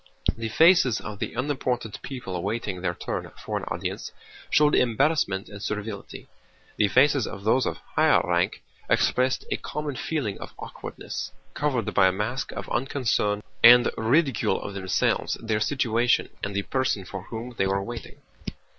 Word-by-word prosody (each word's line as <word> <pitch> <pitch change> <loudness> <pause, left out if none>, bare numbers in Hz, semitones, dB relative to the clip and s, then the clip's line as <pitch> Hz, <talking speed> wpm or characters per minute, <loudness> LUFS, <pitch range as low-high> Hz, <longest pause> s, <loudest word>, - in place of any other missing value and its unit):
The 115 -1 -4
faces 160 - +5
of 105 -1 -7
the - - -4
unimportant 125 -4 -2
people 125 -9 -6
awaiting 100 0 -3
their 90 -1 -1
turn - - -4 0.2
for - - -3
an - - -7
audience - - -4 0.4
showed 150 0 +4
embarrassment 120 -5 +2
and 100 -1 -10
servility; 105 0 -5 0.5
the 105 - +4
faces 135 +3 +4
of 100 - -7
those 125 +5 +3
of - - -2 0.2
higher - - +5
rank 90 0 0 0.3
expressed 130 +1 +2
a - - +1
common 150 -2 -4
feeling 130 -9 -2
of - - -9
awkwardness, - - -6 0.2
covered 130 -8 -1
by 95 - +5
a - - +3
mask 105 +7 -3
of - - -6
unconcern 120 -5 0 0.2
and 120 +1 +9
ridicule 125 - +2
of 100 - -6
themselves, 95 -2 0
their 110 -2 -1
situation, 120 0 +1
and 100 0 -3
the 100 - 0
person 130 -7 -1
for 95 - -6
whom 120 +2 -6
they 95 - +3
were 100 0 0
waiting. 120 +2 -7
115 Hz, 155 wpm, -26 LUFS, 100-130 Hz, 0.5 s, and